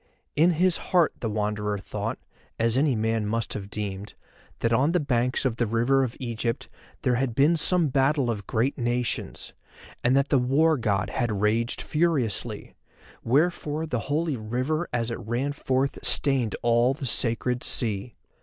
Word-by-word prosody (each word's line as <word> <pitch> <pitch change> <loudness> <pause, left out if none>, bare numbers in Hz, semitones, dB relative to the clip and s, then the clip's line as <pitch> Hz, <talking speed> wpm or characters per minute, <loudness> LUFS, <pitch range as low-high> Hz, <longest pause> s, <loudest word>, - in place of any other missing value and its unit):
In 165 +4 +4
his 180 +2 +2
heart 175 -3 +2
the 115 - -2
Wanderer 105 -1 -1
thought, 95 - -4 0.4
as 115 0 +1
any 140 -1 +2
man 110 -1 0
must 115 +2 -1
have 100 -1 -6
deemed, 100 -1 -5 0.5
that 115 0 +1
on 140 +8 +3
the 180 - +3
banks 125 -3 0
of 120 -3 0
the 120 - 0
River 120 +5 +2
of 125 -2 -4
Egypt 115 0 -3 0.4
there 125 -2 +2
had 125 -3 -1
been 145 +6 +4
some 165 0 +2
battle 135 -1 +2
of 105 -3 -6
great 125 +5 0
nations, 120 0 -2 0.5
and 125 +2 +3
that 140 +1 +1
the 135 - +4
War 150 +6 +3
God 100 -7 -1
had 120 -3 -1
raged 115 +3 +1
furiously, 150 -9 -1 0.5
wherefore 150 +3 +1
the 125 -7 -2
holy 155 0 0
river 130 +9 -2
as 115 -1 -1
it 115 - -4
ran 120 +6 -2
forth 135 -1 -1
stained 130 -6 +2
all 120 +2 +3
the 145 -2 -6
sacred 120 0 +1
sea. 110 -1 0
125 Hz, 165 wpm, -26 LUFS, 115-140 Hz, 0.5 s, In